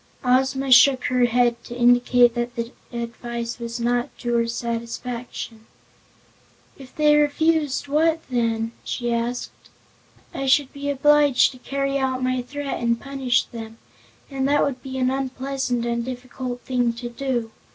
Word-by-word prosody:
Ozma 265 +1 +1
shook 255 +1 +7
her 250 -1 +2
head, 240 0 +1
to 240 - -8
indicate 245 0 +5
that 240 0 -3
the 235 0 -4 0.2
advice 235 0 -5
was 235 0 -5
not 240 +1 0
to 240 -1 -3
her 230 -1 +2
satisfaction. 235 -1 -5 1.1
"If 265 -2 -14
they 300 -1 +4
refuse, 295 -1 +1
what 320 +3 +2
then?" 230 -2 -1
she 240 -1 -2
asked. 235 +1 -4 0.6
"I 270 - -3
should 270 0 +3
be 285 0 -4
obliged 290 -1 +4
to 255 - -14
carry 275 +1 -2
out 260 -1 -1
my 255 0 0
threat 285 +2 -5
and 235 0 +1
punish 270 -3 0
them, 225 -1 -9 0.5
and 270 -1 -1
that 290 +1 +3
would 265 -3 -2
be 265 -1 -6
an 255 0 +1
unpleasant 265 -2 -2
and 235 0 -1
difficult 250 0 -6
thing 245 -2 0
to 240 +1 -6
do. 240 -2 -3
250 Hz, 150 wpm, -23 LUFS, 235-275 Hz, 1.1 s, shook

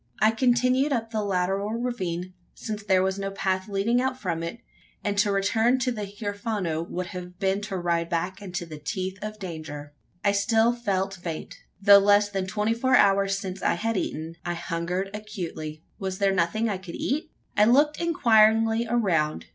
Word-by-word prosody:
I 215 +1 +5
continued 255 +4 +2
up 225 -4 -1
the 215 -2 -1
lateral 195 +1 0
ravine 185 -7 -3 0.2
since 215 -1 -5
there 190 -2 +3
was 190 +1 -1
no 195 0 -2
path 190 0 -2
leading 210 +5 +1
out 260 0 -1
from 170 -7 -2
it; 170 +7 -4 0.5
and 205 -1 -1
to 205 0 +3
return 220 +5 +2
to 255 0 0
the 210 -4 -4
Huerfano, 205 -5 -3
would 180 +1 -3
have 180 0 -8
been 195 0 0
to 205 -2 -4
ride 170 -1 0
back 180 +3 -2
into 180 -3 -5
the 155 -2 -9
teeth 185 +5 -4
of 215 0 -5
danger. 155 -6 -7 0.3
I 200 - +5
still 220 +4 +3
felt 195 -5 -1
faint. 165 -3 -6 0.2
Though 200 0 +8
less 205 +1 +4
than 195 -2 -2
twenty 210 +3 0
four 260 +3 +2
hours 195 -2 +4
since 190 -1 -6
I - - +2
had 225 +6 -1
eaten, 165 -3 -3
I 175 0 -2
hungered 175 +3 -3
acutely. 175 -7 -6 0.2
Was 190 -1 -3
there 195 -1 +2
nothing 190 +5 +1
I 200 -4 -2
could 185 -3 -8
eat? 310 +4 -2 0.3
I 210 - +5
looked 290 +7 +4
inquiringly 225 -7 +4
around. 175 -10 +1
200 Hz, 180 wpm, -26 LUFS, 180-225 Hz, 0.5 s, Though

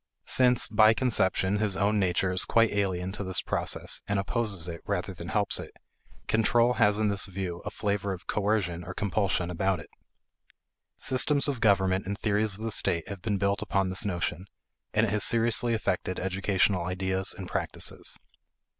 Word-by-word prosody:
Since, 125 -1 +3
by 110 0 +5
conception, 100 -5 +1
his 105 -3 0
own 105 +1 +2
nature 95 0 +1
is 90 +1 +1
quite 115 -1 +3
alien 95 -2 -1
to 100 - -5
this 95 -2 -1
process - - -1
and 100 - 0
opposes 100 -3 +1
it 85 -1 -7
rather - - -3
than - - -9
helps - - +1
it, - - -8 0.5
control 115 +2 +3
has 105 0 +4
in 110 -1 +1
this 100 -1 0
view 90 -2 -5
a - - -2
flavor 100 -1 -2
of 95 -1 -7
coercion 100 -5 -1
or 90 +2 -8
compulsion 95 -3 -1
about 95 +1 0
it. - - -13 1.1
Systems 140 +3 +1
of 140 -4 -2
government 95 -3 +2
and 100 0 -3
theories 105 -1 0
of 105 - -12
the 115 0 -3
state 85 -5 -1
have 100 -3 -7
been 105 0 -1
built 100 +1 0
upon 100 -3 0
this 95 +5 +2
notion, 90 -2 -3 0.4
and 110 - +2
it 100 - -2
has 105 -1 +1
seriously 115 0 +2
affected 95 -4 -2
educational 95 -1 0
ideas 95 +1 0
and 95 -3 -7
practices. - - -2
100 Hz, 175 wpm, -28 LUFS, 95-110 Hz, 1.1 s, by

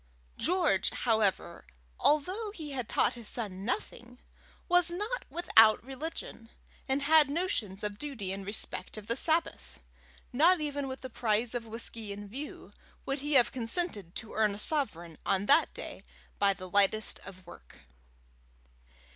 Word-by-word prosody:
George, 335 - +2
however, 220 -5 0 0.4
although 370 +9 +1
he 310 -5 -7
had 250 -5 -5
taught - - +2
his 235 -3 -7
son 200 -6 0
nothing, 245 +1 -5 0.5
was 355 -1 +5
not 420 +8 -3
without 225 -12 +5
religion, 265 -4 -6 0.4
and 270 +1 0
had 305 0 +5
notions 250 - -2
of 210 -1 -4
duty 250 -11 -4
in 195 0 -5
respect 205 +2 -4
of 215 - -8
the 230 - -1
Sabbath. 320 +5 +1 0.5
Not 335 +7 +5
even 290 -2 -3
with 260 0 -7
the 260 - -7
prize 225 +1 +1
of 235 -2 -4
whisky 225 -1 +1
in 205 0 -7
view, 275 +9 -8 0.3
would 275 +1 -2
he 295 +2 -3
have 250 -3 +5
consented 230 - -2
to 220 - -6
earn 215 -2 +1
a - - -9
sovereign 175 - -1
on 195 0 0
that - - +4
day - - -8 0.4
by 200 -1 +4
the 185 -1 -9
lightest 200 +3 +1
of 185 -1 -13
work. 65 - -15
235 Hz, 150 wpm, -30 LUFS, 205-295 Hz, 0.5 s, was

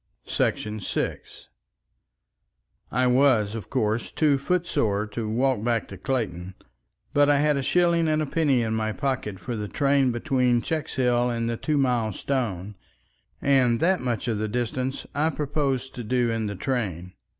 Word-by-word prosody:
§ 105 0 -1 0.2
6 - - -8 1.4
I 125 +2 +2
was, 125 -5 +3
of 115 -2 -6
course, 110 +2 -1
too 145 -3 +2
footsore 140 - 0
to 110 0 -4
walk 125 0 +1
back 115 -2 0
to 100 - -8
Clayton, 95 -9 -3 0.6
but 145 0 +4
I 145 - +5
had 150 +1 +3
a 140 - 0
shilling 170 +4 +2
and 155 0 +2
a 155 - 0
penny 140 -5 +2
in 110 -1 -1
my 110 0 -1
pocket 130 -7 -2
for 115 +7 -4
the 105 -1 -4
train 140 +1 +2
between 120 0 +1
Checkshill 125 -6 0
and 115 -1 -2
Two 155 -1 0
Mile 120 -6 +1
Stone, 105 -7 -3 0.7
and 130 -4 +3
that 185 +2 +3
much 125 -1 -2
of 110 -3 0
the 110 - -1
distance 125 +3 -2
I 150 +3 +1
proposed 140 -4 -2
to 120 - -6
do 120 +1 +1
in 110 -1 -1
the 100 - -4
train. 95 - -3
125 Hz, 160 wpm, -25 LUFS, 110-140 Hz, 1.4 s, I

